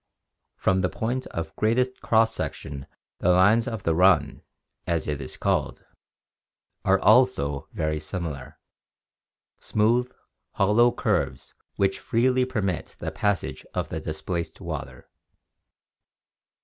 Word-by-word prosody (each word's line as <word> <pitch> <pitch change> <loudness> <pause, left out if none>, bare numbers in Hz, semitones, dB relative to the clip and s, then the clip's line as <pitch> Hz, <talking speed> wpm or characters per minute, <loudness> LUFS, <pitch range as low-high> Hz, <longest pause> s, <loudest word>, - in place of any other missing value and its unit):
From 95 0 +1
the 90 -1 +1
point 125 +3 -3
of 85 -1 -5
greatest 125 +4 +1
cross 115 0 +3
section 70 -9 -5 0.3
the - - +1
lines 100 +6 +5
of 115 -5 -4
the 80 - +2
"run," 85 -4 +3 0.5
as 85 -2 -1
it 75 -1 -2
is 65 - -8
called, - - -1 1.0
are 95 0 +4
also 110 - +3
very 75 0 -1
similar 80 -5 -6 0.5
— - - -68 0.3
smooth, 120 +4 +1 0.4
hollow 110 +5 +4
curves - - -1 0.2
which 95 0 +1
freely 125 +2 +2
permit 105 -9 -3
the - - -4
passage 100 -2 -1
of - - -2
the - - -3
displaced 85 -2 -4
water. - - -7
95 Hz, 120 wpm, -25 LUFS, 85-115 Hz, 1.0 s, lines